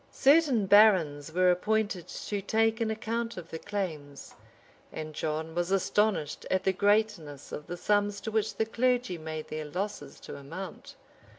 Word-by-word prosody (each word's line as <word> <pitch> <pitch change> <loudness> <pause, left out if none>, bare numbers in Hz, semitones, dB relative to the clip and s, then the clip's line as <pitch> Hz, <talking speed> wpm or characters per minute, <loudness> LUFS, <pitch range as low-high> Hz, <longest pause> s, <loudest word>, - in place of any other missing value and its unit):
Certain 275 -7 +4
barons 185 -8 +5
were 180 +2 +4
appointed 205 -1 0
to 205 -1 -4
take 225 +3 +1
an 225 - +1
account 230 +1 -3
of 170 -2 -9
the 160 - -5
claims; 155 -9 -5 0.6
and 155 0 -6
John 160 +1 -3
was 175 +1 -1
astonished 195 -3 +1
at 185 0 +1
the 190 - +2
greatness 200 -8 0
of 150 - -7
the 175 - -5
sums 205 +1 +1
to 220 - -4
which 220 -1 0
the 220 - 0
clergy 245 -4 0
made 155 -1 -6
their 155 0 -4
losses 180 -2 -5
to - - -8
amount. 165 +8 -8
195 Hz, 160 wpm, -29 LUFS, 160-220 Hz, 0.6 s, barons